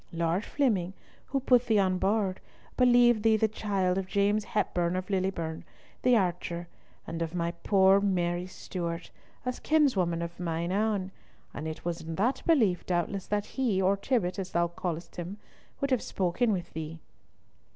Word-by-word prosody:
Lord 170 Hz, +3 st, 0 dB
Flemyng, 205 Hz, -11 st, 0 dB, 0.3 s
who 275 Hz, -, 0 dB
put 250 Hz, -2 st, +3 dB
thee 220 Hz, -, +3 dB
on 185 Hz, -2 st, +2 dB
board, 195 Hz, -1 st, +1 dB, 0.4 s
believed 245 Hz, -2 st, +5 dB
thee 220 Hz, 0 st, +4 dB
the 220 Hz, -, +3 dB
child 195 Hz, -4 st, 0 dB
of 190 Hz, -, -4 dB
James 205 Hz, +2 st, +1 dB
Hepburn 175 Hz, -4 st, 0 dB
of 185 Hz, +2 st, -3 dB
Lillieburn, 185 Hz, -4 st, -1 dB, 0.4 s
the 250 Hz, -1 st, +5 dB
archer, 175 Hz, -2 st, -2 dB, 0.4 s
and 165 Hz, +1 st, -5 dB
of 165 Hz, +1 st, -3 dB
my 170 Hz, -1 st, 0 dB
poor 190 Hz, +2 st, +4 dB
Mary 180 Hz, -2 st, 0 dB
Stewart, 170 Hz, -2 st, -5 dB, 0.3 s
a 250 Hz, -, +1 dB
kinswoman 195 Hz, -, +2 dB
of 170 Hz, +1 st, -7 dB
mine 170 Hz, 0 st, -2 dB
ain; 200 Hz, -2 st, 0 dB, 0.4 s
and 150 Hz, +3 st, -5 dB
it 160 Hz, +1 st, -6 dB
was 170 Hz, -1 st, -2 dB
in 165 Hz, 0 st, -5 dB
that 245 Hz, +8 st, +1 dB
belief 220 Hz, -, +3 dB
doubtless 180 Hz, +2 st, -1 dB
that 205 Hz, 0 st, 0 dB
he, 240 Hz, -8 st, 0 dB
or 190 Hz, +1 st, +3 dB
Tibbott, 200 Hz, -3 st, -1 dB
as 190 Hz, -1 st, -5 dB
thou 170 Hz, 0 st, +2 dB
call'st 170 Hz, -1 st, -5 dB
him, 180 Hz, +3 st, -5 dB, 0.4 s
would 275 Hz, 0 st, 0 dB
have 255 Hz, -, +3 dB
spoken 195 Hz, +6 st, 0 dB
with 175 Hz, -3 st, -3 dB
thee." 160 Hz, +1 st, -5 dB
190 Hz, 165 wpm, -29 LUFS, 170-215 Hz, 0.4 s, believed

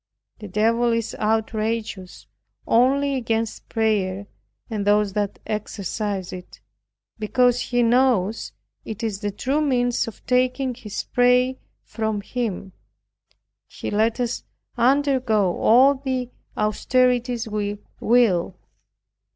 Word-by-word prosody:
The 210 Hz, -, -8 dB
devil 230 Hz, +4 st, +2 dB
is 230 Hz, -1 st, -2 dB
outrageous 220 Hz, -3 st, -2 dB, 0.4 s
only 275 Hz, +4 st, +3 dB
against 230 Hz, -3 st, -2 dB
prayer, 205 Hz, -4 st, 0 dB, 0.4 s
and 215 Hz, -4 st, -3 dB
those 205 Hz, -1 st, +2 dB
that 205 Hz, -1 st, -2 dB
exercise 205 Hz, -2 st, -3 dB
it; 180 Hz, -1 st, -10 dB, 0.6 s
because 245 Hz, +3 st, +2 dB
he 245 Hz, -1 st, +1 dB
knows 230 Hz, -4 st, +2 dB, 0.3 s
it 220 Hz, +1 st, -7 dB
is 210 Hz, -4 st, -2 dB
the 205 Hz, -1 st, -2 dB
true 265 Hz, +9 st, -1 dB
means 245 Hz, -4 st, +1 dB
of 225 Hz, -, -10 dB
taking 255 Hz, +1 st, +1 dB
his 230 Hz, -4 st, -6 dB
prey 250 Hz, +1 st, +2 dB, 0.2 s
from 220 Hz, -2 st, -3 dB
him. 200 Hz, -4 st, -4 dB, 1.0 s
He -, -, -6 dB
lets 220 Hz, +3 st, +1 dB
us 245 Hz, -1 st, -2 dB, 0.3 s
undergo 250 Hz, -6 st, +2 dB
all 260 Hz, +5 st, +6 dB
the 260 Hz, -2 st, -3 dB, 0.3 s
austerities 245 Hz, +2 st, +1 dB
we 205 Hz, -1 st, -2 dB, 0.2 s
will. 210 Hz, -7 st, +2 dB
230 Hz, 110 wpm, -23 LUFS, 210-250 Hz, 1.0 s, all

